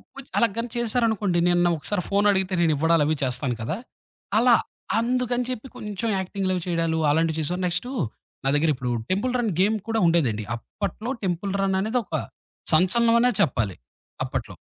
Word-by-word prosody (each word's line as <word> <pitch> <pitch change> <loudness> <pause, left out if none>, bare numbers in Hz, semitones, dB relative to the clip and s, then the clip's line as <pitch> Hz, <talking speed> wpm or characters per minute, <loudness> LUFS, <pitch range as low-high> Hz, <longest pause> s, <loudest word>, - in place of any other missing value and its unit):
కొంచ్ 275 -1 -10
అలాగాని 230 +1 +1
చేశారనుకోండి. 220 -6 +1
నేను 175 0 +3
నా - - +4
ఒకసారి 180 +5 -2
ఫోనడిగితే 200 -2 +2
నేను 165 -2 +3
ఇవ్వడాలవి 155 0 +3
చేస్తాను 125 -1 -1
కదా! 120 +11 -2 0.6
అలా, 240 0 +6 0.4
అందుకని 245 +1 0
చెప్పి 255 0 -4
కొంచెం 210 +2 -3
యాక్టింగ్‌లవి 185 -1 -2
చేయడాలు 165 -2 0
అలాంటివి 160 +1 +1
చేశా. 175 +4 -1
నెక్స్టు 180 +8 -1 0.5
నా - - +3
దగ్గర 155 +2 +3
ఇప్పుడు 125 -1 -3 0.2
టెంపుల్ 215 +7 0
రన్ 230 -4 0
గేమ్ 210 +4 +3
కూడా 225 -1 +1
ఉండేదండి. 130 -11 +2
అప్పట్లో 200 - -5
టెంపుల్ 190 +2 -2
రన్ 190 -1 +1
అనేది 220 +5 0
ఒక - - -5 0.6
సంచలనమనే 235 +6 +4
చెప్పాలి. 110 - +1 0.5
అప్పట్లో. - - -4
190 Hz, 145 wpm, -24 LUFS, 165-230 Hz, 0.6 s, అలా